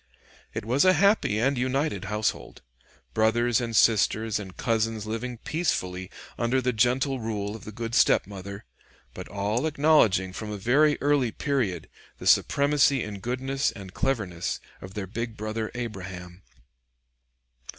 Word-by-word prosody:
It - - -3
was 125 +5 +3
a 185 0 +6
happy 200 - +3
and 130 +3 +1
united 130 - -1
household: 105 +2 -3 0.5
brothers 120 +2 +2
and 115 -1 -3
sisters 110 0 +3
and 95 -3 -9
cousins 115 -2 0
living 115 +3 -4
peacefully 95 - -2 0.3
under 120 +3 +2
the 125 -1 0
gentle 125 +4 +1
rule 105 -2 -3
of 110 - -10
the 110 - -7
good 115 +1 -5
stepmother, 100 -4 +1 0.5
but - - -8
all 105 +8 -1
acknowledging 140 -12 +3
from 110 +2 -6
a 105 - -4
very 145 +9 +3
early 140 -5 +2
period 115 - -1 0.3
the - - -10
supremacy 140 -2 +4
in 105 -2 -6
goodness 130 +5 -1
and 95 -3 -10
cleverness 105 -11 -2 0.2
of 95 0 -10
their 105 -2 -3
big 115 +3 -5
brother 110 +1 -3
Abraham. 95 -6 -7
115 Hz, 140 wpm, -26 LUFS, 100-130 Hz, 0.5 s, a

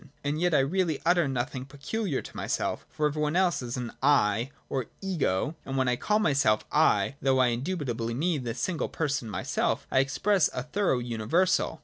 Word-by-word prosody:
And 145 +3 -1
yet 175 -3 +2
I - - +5
really 165 +2 0
utter 175 -2 +4
nothing 130 0 -2
peculiar 145 +5 -3
to - - -11
myself, - - -2
for 150 - -1
every 150 +1 0
one 150 +2 0
else 180 -5 +2
is 125 0 -4
an 125 -2 -4
' - - -39 0.3
I 115 +5 -2
' - - -36
or 130 -4 -2
' - - -37
Ego,' 155 - -1
and 135 0 -4
when 130 -1 +2
I 125 - +2
call 210 +11 +1
my 190 -9 +2
self 110 -6 +2
' - - -38 0.2
I,' 140 - -1
though 135 -1 +3
I 130 -1 +4
indubitably 120 -4 -2
mean 155 0 0
the 115 -2 -3
single 165 +7 -2
person 140 -7 -2
myself, 100 - -1
I 130 - +4
express 180 +7 +2
a 125 - -2
thorough 195 -3 0
universal. 125 +10 0
140 Hz, 215 wpm, -28 LUFS, 125-170 Hz, 0.3 s, I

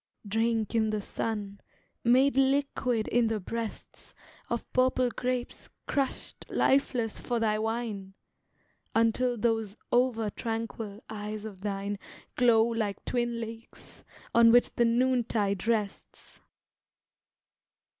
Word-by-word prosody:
Drink 225 +1 0
in 220 -1 +2
the 215 0 -1
sun, 205 -1 -4 0.4
made 260 +3 +4
liquid 270 -4 +1
in 240 -1 +3
the 220 -1 -1
breasts 225 +3 -6 0.3
Of - - -4
purple 255 -1 +3
grapes 250 0 -3 0.2
crushed 275 -2 -2
lifeless 250 -5 +1
for 240 -2 -1
thy 215 -1 +1
wine, 220 -4 -3 0.8
Until 235 +2 +2
those 225 -1 0
over 240 -4 +2
tranquil 225 -2 -4
eyes 210 0 -5
of 195 -4 -9
thine 200 0 -3 0.4
Glow 235 -3 +5
like 225 -4 -2
twin 240 -1 -1
lakes, 225 0 -9 0.3
on 230 0 +7
which 245 +1 +5
the 235 - +3
noontide 230 -5 +1
rests. 215 -4 -3
225 Hz, 110 wpm, -29 LUFS, 215-245 Hz, 0.8 s, on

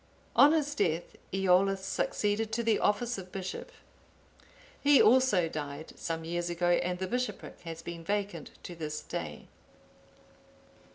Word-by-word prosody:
On 290 - +8
his 295 -2 +1
death, 170 - -1 0.2
Eolla 195 +1 +3
succeeded 205 +3 -1
to 235 +1 0
the 225 -2 +2
office 235 +1 +1
of 185 -1 -10
bishop. 190 -1 -5 1.1
He 285 -1 +6
also 225 -7 +5
died 150 -1 -6
some 165 -1 -4
years 175 +1 -2
ago, 175 0 0
and 180 +1 +2
the 190 - -2
bishopric 250 +6 -3
has 165 0 -7
been 170 0 -7
vacant 200 -3 -2
to 175 - -7
this 150 -2 -5
day. 75 -2 -6
185 Hz, 135 wpm, -30 LUFS, 165-215 Hz, 1.1 s, On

